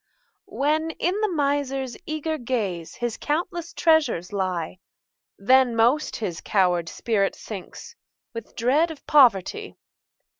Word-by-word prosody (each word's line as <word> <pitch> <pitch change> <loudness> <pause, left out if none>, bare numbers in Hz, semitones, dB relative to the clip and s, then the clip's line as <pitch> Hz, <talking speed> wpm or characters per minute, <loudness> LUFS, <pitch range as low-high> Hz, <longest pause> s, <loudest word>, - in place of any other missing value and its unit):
When, 310 +3 0
in 375 +4 0
the 430 - +2
miser's 280 -5 -1
eager 310 0 -3
gaze, 205 -10 -3
His 240 -2 -3
countless 340 +2 -3
treasures 300 - +2
lie, 185 -3 -2 0.6
Then 255 +3 +4
most 245 +7 +2
his 185 -7 -4
coward 180 -4 +1
spirit 205 -4 0
sinks, 210 - -9 0.4
With 230 -1 -8
dread 280 +8 +2
of 320 -3 -10
poverty. 280 - +3
255 Hz, 115 wpm, -24 LUFS, 200-310 Hz, 0.6 s, Then